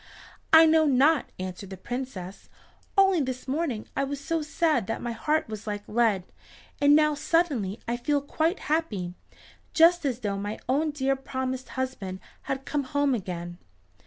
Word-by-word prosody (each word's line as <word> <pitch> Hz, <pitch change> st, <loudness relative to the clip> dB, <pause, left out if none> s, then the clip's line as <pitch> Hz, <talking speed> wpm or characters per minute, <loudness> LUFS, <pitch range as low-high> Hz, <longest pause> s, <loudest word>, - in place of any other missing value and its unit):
"I 320 Hz, 0 st, +9 dB
know 315 Hz, -1 st, +4 dB
not," 280 Hz, +2 st, +3 dB
answered 185 Hz, +1 st, -6 dB
the 190 Hz, -, -7 dB
Princess. 205 Hz, -4 st, -6 dB, 0.5 s
"Only 385 Hz, -4 st, +5 dB
this 255 Hz, -1 st, -4 dB
morning 270 Hz, -5 st, -2 dB
I 275 Hz, -, +1 dB
was 275 Hz, 0 st, -3 dB
so 325 Hz, +3 st, -1 dB
sad 300 Hz, -, +1 dB
that 225 Hz, -, -2 dB
my 240 Hz, -, -3 dB
heart 305 Hz, +7 st, 0 dB
was 215 Hz, -1 st, -7 dB
like 205 Hz, -1 st, -4 dB
lead, 215 Hz, -4 st, +2 dB, 0.6 s
and 290 Hz, 0 st, +6 dB
now 305 Hz, 0 st, +4 dB
suddenly 285 Hz, -, 0 dB
I 235 Hz, +1 st, -1 dB
feel 285 Hz, +4 st, +1 dB
quite 320 Hz, +5 st, -1 dB
happy, 215 Hz, -, -1 dB, 0.6 s
just 345 Hz, +1 st, +6 dB
as 255 Hz, -4 st, -1 dB
though 200 Hz, -3 st, -2 dB
my 205 Hz, +2 st, -4 dB
own 290 Hz, +5 st, +1 dB
dear 275 Hz, -2 st, 0 dB
promised 260 Hz, -1 st, -4 dB
husband 210 Hz, -8 st, -3 dB, 0.3 s
had 270 Hz, 0 st, -2 dB
come 290 Hz, -2 st, -1 dB
home 285 Hz, +1 st, +1 dB
again." 175 Hz, -5 st, -5 dB
260 Hz, 160 wpm, -27 LUFS, 215-300 Hz, 0.6 s, I